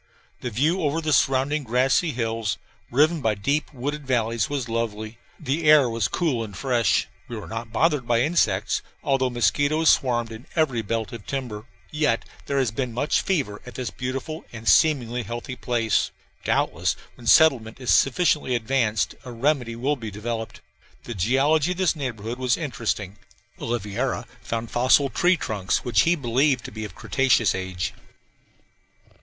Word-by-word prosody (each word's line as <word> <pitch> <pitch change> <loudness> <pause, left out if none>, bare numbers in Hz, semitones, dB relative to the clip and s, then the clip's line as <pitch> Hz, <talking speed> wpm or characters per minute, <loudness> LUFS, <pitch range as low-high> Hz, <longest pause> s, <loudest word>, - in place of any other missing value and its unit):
The 125 - -4
view 150 - +1
over 150 0 0
the 155 -2 0
surrounding 135 +3 +2
grassy 130 +7 +2
hills, 115 -5 -2 0.3
riven 155 +5 +3
by 110 -4 +1
deep 140 +10 -1
wooded 145 +2 -4
valleys, 115 0 0
was 140 -4 -2
lovely. 115 -1 -3 0.2
The 150 +3 -2
air 150 -4 +7
was 115 -4 0
cool 145 -10 0
and 100 -4 -8
fresh. 120 -3 +1 0.2
We 120 - -6
were 105 - -7
not 115 0 -6
bothered 140 +1 +1
by 120 -1 +3
insects, 110 - +1 0.2
although 135 -2 +1
mosquitoes 145 +6 +3
swarmed 120 -3 +1
in 115 +6 -10
every 140 -8 +1
belt 110 0 -3
of 115 -3 -9
timber. 120 -6 -4 0.3
Yet 150 -7 +1 0.2
there 140 - -1
has 130 -5 +2
been 120 +1 -3
much 145 +5 +1
fever 140 - -1
at 125 - -11
this 125 -5 -4
beautiful 135 +8 -5
and 115 -1 -9
seemingly 125 -6 +3
healthy 120 +4 -6
place. 120 -2 0 0.3
Doubtless - - +1 0.2
when 120 - -12
settlement 130 -8 +5
is 125 - +2
sufficiently 140 -2 +3
advanced 115 -2 0
a 125 - -8
remedy 125 -1 0
will 135 +5 0
be 115 -3 -6
developed. 115 +2 -5 0.4
The 120 - -6
geology 135 - +2
of - - -13
this 185 -3 +2
neighborhood 120 -4 -4
was 125 -2 +1
interesting 110 - -3 0.4
Oliveira 115 +2 -2 0.2
found 115 0 -4
fossil 130 +3 +4
tree 180 +1 +3
trunks 100 - -1
which 115 -4 +4
he 170 +6 +3
believed 130 -1 +1
to - - -7
be 110 0 -5
of 100 - -10
cretaceous 115 +1 +2
age. 95 -2 -3
125 Hz, 160 wpm, -24 LUFS, 115-145 Hz, 0.4 s, air